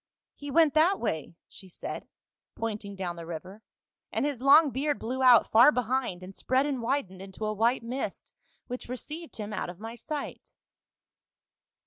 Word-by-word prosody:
' - - -65
He 285 - -8
went 310 0 +4
that 335 +6 +4
way,' 160 -7 -3
she 190 - -12
said, - - -7 0.5
pointing 210 -3 -4
down 180 -3 -4
the 170 - -7
river, 180 +5 -8 0.3
' - - -64
and - - 0
his 285 -5 -2
long 280 +2 +7
beard 285 +3 -1
blew 255 +4 -4
out 250 -3 +6
far 240 +7 +8
behind 250 -7 -1
and 190 +1 -10
spread 260 +2 +1
and 280 -3 -1
w^idened 230 -6 -2
into 195 +2 -6
a 215 - -1
white 230 +3 +1
mist 250 +4 -5 0.3
which 250 -1 -7
received 305 +6 -7
him 210 -1 -6
out 210 - -3
of 175 +1 -9
my 225 +2 -7
sight.' 285 +5 -6
240 Hz, 175 wpm, -28 LUFS, 200-275 Hz, 0.5 s, far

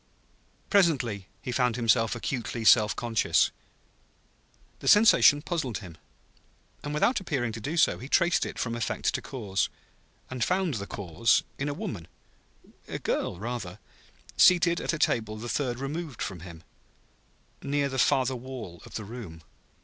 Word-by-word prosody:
Presently 130 - +2 0.2
he 125 - -3
found 125 -2 +1
himself 115 -1 +2
acutely 115 -2 -4
self 110 -2 +6
conscious. 115 -3 +1 1.3
The - - -7
sensation 205 -9 +6
puzzled 140 - -2
him; 90 -6 -10 0.9
and 145 - -4
without 150 - +2
appearing 140 -10 -2
to 110 0 -7
do 150 +9 -3
so, 160 - +3
he 130 - -9
traced 175 +1 +3
it - - -5
from 115 - -2
effect 115 -2 -1
to - - -2
cause; 105 -7 -2 0.6
and 130 -2 -3
found 185 -1 0
the 100 -4 -4
cause 100 +4 +1 0.2
in 140 +2 -1
a 145 - -3
woman 95 - -6 0.8
a - - -4
girl, - - -2
rather, 105 -3 -5 0.6
seated 175 -1 +5
at - - -1
a - - -1
table 110 -8 0
the 115 +3 -7
third 125 -1 -1
removed 140 0 -5
from 95 -3 -5
him, 85 -1 -11 1.0
near 140 0 0
the 130 -1 -3
farther 130 +1 +2
wall 120 -8 -8
of - - -12
the 110 - -4
room. 100 -8 -9
120 Hz, 150 wpm, -27 LUFS, 110-145 Hz, 1.3 s, self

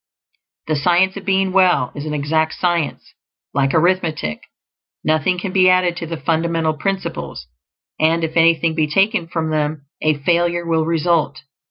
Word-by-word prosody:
The 155 - -1
Science 180 +5 +2
of 200 - -8
Being 190 -1 +1
Well 185 -9 +3
is 145 +1 -6
an 150 - -3
exact 155 +2 0
science, 175 -4 -2 0.4
like 135 0 +1
arithmetic; 160 - 0 0.6
nothing 155 +4 +1
can 185 +1 -4
be 185 -1 +4
added 185 -1 +2
to 165 - -5
the 165 0 -5
fundamental 160 +1 0
principles, 190 - -4 0.5
and 165 +1 +2
if 160 0 -3
anything 165 0 +3
be 155 -1 0
taken 195 +3 +1
from 160 -1 -3
them, 150 -1 -2 0.2
a 155 -1 +1
failure 170 +3 0
will 165 -1 +1
result. 165 -2 0
165 Hz, 155 wpm, -19 LUFS, 155-180 Hz, 0.6 s, be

